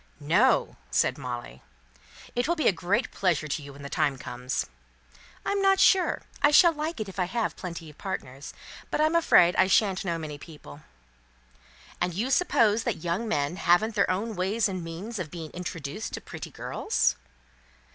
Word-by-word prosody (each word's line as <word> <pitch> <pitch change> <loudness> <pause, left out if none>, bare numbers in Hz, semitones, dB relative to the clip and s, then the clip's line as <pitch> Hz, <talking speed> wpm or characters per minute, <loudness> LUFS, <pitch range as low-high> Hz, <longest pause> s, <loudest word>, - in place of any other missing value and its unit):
"No!" - - +2
said 130 - +1
Molly. 120 - -6 0.7
"It 245 +2 0
will 340 - +1
be 315 - +1
a - - +7
great 195 +7 -1
pleasure 170 -5 0
to 150 +1 -2
you 140 -1 -10
when 140 +1 -12
the - - -5
time 145 -2 0
comes." 125 0 -3 0.8
"I'm 400 0 0
not 390 0 +4
sure. 380 -2 +4 0.2
I 290 - +6
shall 335 +3 +7
like 310 -1 -4
it 215 - -3
if 195 0 -8
I 180 - +2
have 220 +5 -2
plenty 170 -3 -7
of 150 - -24
partners; 140 -8 -6 0.4
but - - -2
I'm 310 +1 +3
afraid 180 - +5
I - - +5
shan't 195 -1 +2
know 170 -3 -1
many 150 -3 -6
people." 145 - -12 1.2
"And 180 -1 0
you 235 +8 -1
suppose 230 - +3
that 170 - -3
young 175 +7 -1
men 145 -4 -1
haven't 190 +6 +3
their 200 -1 +2
own 210 +4 -1
ways 200 +5 +1
and 185 -3 -4
means 185 +7 -6
of 170 -4 -4
being 160 -1 -8
introduced 180 +2 -6
to - - -3
pretty - - -8
girls?" - - 0
185 Hz, 180 wpm, -27 LUFS, 155-225 Hz, 1.2 s, a